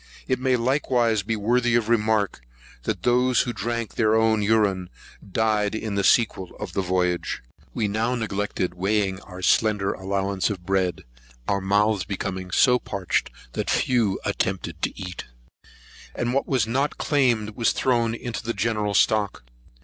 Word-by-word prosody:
It 130 - 0
may 130 0 +2
likewise 120 -3 +1
be 110 +3 -2
worthy 120 +3 +2
of 115 -2 +1
remark, 110 - +1 0.4
that - - -2
those 125 +1 +3
who 120 - -2
drank 115 -1 -3
their 110 -1 +2
own 110 -1 +3
urine 100 -4 +1 0.4
died 110 0 +1
in 110 -1 -3
the 100 0 0
sequel 95 -6 +2
of 100 -5 -6
the 95 - 0
voyage. 90 -7 -1 0.3
We 110 - 0
now 110 +4 0
neglected 105 -5 -2
weighing 95 +1 0
our 90 -1 -10
slender 105 +1 +2
allowance 95 +1 -1
of 95 -4 -5
bread, 95 -1 0 0.4
our 100 0 +1
mouths 100 +1 +2
becoming 95 0 -4
so 125 +6 +4
parched, 95 -5 -2 0.2
that - - -3
few 115 -6 +1
attempted 85 -3 -2
to - - -2
eat; 90 -2 -6 0.9
and 120 +1 -1
what 135 - 0
was 130 -6 +2
not 135 +6 -1
claimed 120 -7 +1
was 115 +2 +1
thrown 120 -3 +1
into 120 0 -5
the 115 +1 -3
general 105 0 0
stock. 100 - +2
105 Hz, 155 wpm, -24 LUFS, 95-115 Hz, 0.9 s, so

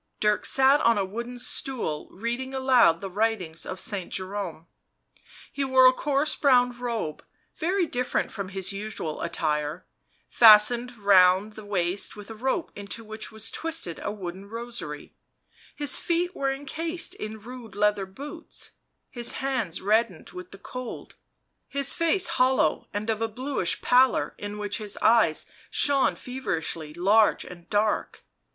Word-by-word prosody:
Dirk 210 0 +2
sat 270 +2 +5
on 230 -1 +4
a 200 - +1
broken 235 +5 -6
stool, 245 - -2
reading 240 +6 -4
aloud 250 -10 +4
the 195 - -5
writings 195 -6 -1
of 185 - -5
Saint 195 -4 -4
Jerome. 185 -4 -4 0.9
He 280 - -2
wore 260 -1 +5
a 255 - +8
coarse 290 +2 0
brown 250 -3 +4
robe, 235 -10 -4 0.3
very 360 +3 +1
different 250 -5 -1
from 200 -3 -5
his 195 0 -3
usual 195 -6 -5
attire, 155 -1 -2 0.4
fastened 235 +2 +6
round 195 0 +5
the 215 - -10
waist 185 -1 0
with 210 +1 -10
a - - -5
rope 265 +9 -2
into 205 +3 -7
which 220 0 -7
was 220 0 -4
twisted 325 - -3
a - - -2
wooden 195 -1 -7
rosary; 235 +2 -7 0.6
his 290 -3 +1
feet 350 +2 -1
were 275 -1 0
encased 325 +6 -4
in 220 - -7
rude 230 -2 -10
leather 205 -1 +1
boots, 290 - -9 0.4
his 240 -1 -1
hands 255 -10 -2
reddened 215 -3 +1
with 180 0 -9
the 195 - -11
cold, 250 +4 -8 0.6
his 280 0 +1
face 345 +2 +2
hollow 260 - +2
and 215 +2 -2
of 220 0 -3
a 225 - +1
bluish 250 -4 -2
pallor 255 +1 +4
in 205 0 -5
which 205 0 -2
his 210 -2 -6
eyes 220 -8 +3 0.2
shone 280 -2 +2
feverishly 165 -11 -4
large 200 +7 +3
and 175 -1 -12
dark. 210 0 0
220 Hz, 145 wpm, -26 LUFS, 195-260 Hz, 0.9 s, a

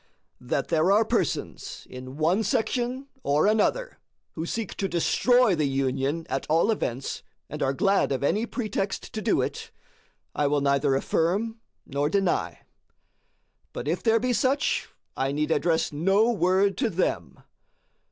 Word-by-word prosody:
That 125 +2 -2
there 165 +3 +3
are 215 +3 +4
persons 220 - -2
in 130 +2 -9
one 170 +7 +2
section 240 +5 -1
or 145 - +2
another 220 - +1 0.3
who 160 +1 -5
seek 225 +1 -3
to 195 - -1
destroy 245 +6 +3
the 155 -4 +1
Union 135 +4 -1
at 135 - -3
all 165 +8 +3
events, 135 - -3 0.3
and - - -6
are 135 - +2
glad 195 +3 +2
of 135 0 -1
any 215 +10 +1
pretext 205 -6 -3
to 215 - -3
do - - +2
it, - - -5 0.6
I 145 - +1
will 145 0 +1
neither 140 0 +2
affirm 200 +11 0 0.3
nor 145 +2 -1
deny; 195 0 0 1.1
but 125 - -5
if 170 +3 -1
there 225 -1 +3
be 250 +2 0
such, 275 +4 +1 0.3
I 135 +1 -1
need 150 +2 -1
address 160 -1 +1
no 195 +9 +3
word 195 -1 +2
to 245 -4 +1
them. 180 -1 -2
180 Hz, 150 wpm, -26 LUFS, 145-220 Hz, 1.1 s, are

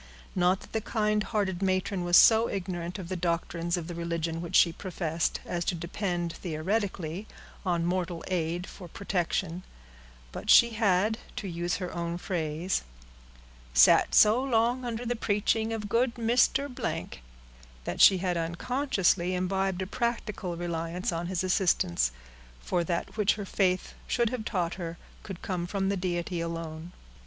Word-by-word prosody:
Not 180 +1 +2
that - - -14
the 220 - 0
kind 215 -1 0
hearted 200 -4 -1
matron 185 -1 0
was 175 0 +5
so 225 +1 +7
ignorant 180 -1 -4
of 185 -3 -7
the 185 - -3
doctrines 170 0 -1
of 170 - -4
the 175 - -6
religion 170 -1 -2
which 170 - -4
she 170 - +6
professed, 170 -3 -2
as 175 0 -2
to 180 - 0
depend, 175 0 -3
theoretically, 185 +2 -3 0.4
on 175 -3 0
mortal 175 -1 -2
aid 175 -1 -1
for 185 -2 -10
protection; 180 -1 -2 0.7
but - - -7
she 235 0 +8
had, 215 0 +2 0.2
to 200 - -4
use 175 0 -2
her 180 -2 -4
own 170 0 -3
phrase, 170 0 -2 0.9
"sat - - +6
so 220 +5 +6
long 245 0 +1
under 235 0 -3
the 245 +1 0
preaching 220 +1 0
of 220 -2 -3
good 235 +3 +1
Mr.——," 245 - 0 0.6
that - - -2
she 190 - +8
had 180 -1 -1
unconsciously 185 - 0
imbibed 190 0 0
a - - -4
practical 210 -5 -3
reliance 170 +1 -2
on 170 0 -3
his 185 0 -1
assistance, 125 - +2 0.5
for 170 - -1
that 170 +5 -3
which 210 -1 +3
her 205 -1 -5
faith 185 -2 0
should 235 -2 +1
have 245 -4 -4
taught 175 -6 -1
her 170 0 -5 0.2
could 190 -4 -9
come 175 -2 -2
from 195 0 -1
the 200 - +1
Deity 175 -1 -2
alone. 165 0 -5
180 Hz, 155 wpm, -28 LUFS, 170-210 Hz, 0.9 s, she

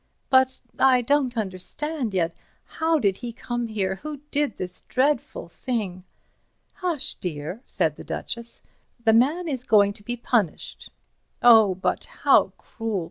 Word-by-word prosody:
"But—I 260 -1 +3
don't 265 -2 +1
understand 225 - -3
yet. 165 -2 0 0.3
How 320 0 +1
did 200 -8 +1
he 240 -1 -6
come 240 0 -4
here? 190 -3 -2
Who 300 +6 -6
did 290 -6 0
this 180 0 -6
dreadful 265 -7 0
thing?" 190 -3 -4 0.7
"Hush, 340 -7 -2
dear," 165 +4 -5
said - - 0
the - - -9
Duchess, 235 0 -6 0.4
"the 220 - +6
man 295 +10 +3
is 265 -5 -2
going 205 -4 +4
to 205 - -13
be 240 +3 -4
punished." 225 -8 -1 0.5
"Oh, 220 -5 +7
but—how 185 - +2
cruel! 225 -4 -4
235 Hz, 135 wpm, -24 LUFS, 195-265 Hz, 0.7 s, Oh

